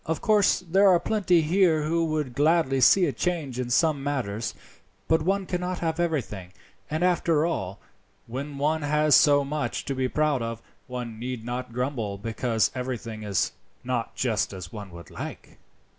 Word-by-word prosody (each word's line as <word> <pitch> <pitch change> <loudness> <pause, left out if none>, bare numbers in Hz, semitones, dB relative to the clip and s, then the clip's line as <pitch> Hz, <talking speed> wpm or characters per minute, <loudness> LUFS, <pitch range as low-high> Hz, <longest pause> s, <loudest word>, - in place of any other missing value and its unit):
Of 160 0 -1
course 210 -4 +3
there 190 +3 +3
are 180 -2 +5
plenty 180 -2 +2
here 160 -1 +3
who 165 +2 +1
would 155 -5 -2
gladly 145 -2 +2
see 185 +7 +6
a 150 - 0
change 145 -3 -2
in 125 -1 -2
some 150 +2 +2
matters, 120 -6 -2 0.5
but 160 0 +3
one 195 +4 0
cannot 180 0 -2
have 165 -1 -2
everything; 115 - -2 0.4
and, 155 +3 -1
after 170 -3 +2
all, 100 - -3 0.5
when 140 +4 -6
one 155 +3 +1
has 150 0 +3
so 145 -1 +5
much 150 +1 -3
to 140 - -2
be 130 -1 -1
proud 150 -3 +1
of, 115 0 -4 0.3
one 120 -3 -6
need 125 -1 -5
not 125 +1 -4
grumble 120 -5 -2
because 115 +1 0
everything 120 -4 -5
is 100 -3 0 0.3
not 120 -2 -2
just 115 -5 0
as 90 -3 -8
one 105 -3 -7
would 85 -1 -12
like." - - -8
140 Hz, 170 wpm, -26 LUFS, 120-165 Hz, 0.5 s, see